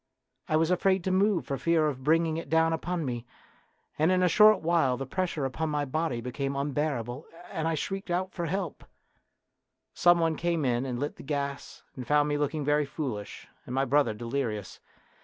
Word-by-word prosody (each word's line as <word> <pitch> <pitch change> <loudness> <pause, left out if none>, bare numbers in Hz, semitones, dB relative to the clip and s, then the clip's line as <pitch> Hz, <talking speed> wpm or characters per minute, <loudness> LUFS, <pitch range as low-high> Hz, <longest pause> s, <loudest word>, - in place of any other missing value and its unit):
I 155 - +2
was 160 +2 +2
afraid 190 0 +2
to 190 - -1
move 195 0 +2
for 135 -2 -3
fear 165 -2 +2
of 130 -3 -4
bringing 160 +2 +2
it 165 - -6
down 160 +1 +3
upon 170 0 -2
me, 120 -3 -3 0.8
and 160 +4 +4
in 185 0 +3
a - - +5
short 215 +4 +6
while 160 -6 +2
the 135 - -4
pres 185 +7 -1
sure 150 -5 -3
upon 155 +4 -2
my 150 -1 -1
body 150 -3 -2
became 135 +3 -3
unbearable, 140 -2 -2 0.2
and 160 0 -2
I 165 - +1
shrieked 195 +5 -4
out 185 +2 -1
for 170 -2 -3
help. 180 -1 -3 1.1
Some 175 0 +5
one 165 -1 +1
came 170 -2 0
in 125 +1 0
and 125 -2 -3
lit 145 +2 -3
the - - -10
gas, 140 -1 -4
and 125 -2 -7
found 150 +1 +3
me 145 - 0
looking 150 0 -1
very 145 0 +2
foolish 125 -9 -5 0.2
and 125 - -4
my 135 +1 +2
brother 135 -4 +2
delirious. 115 -3 -3
150 Hz, 195 wpm, -28 LUFS, 135-170 Hz, 1.1 s, short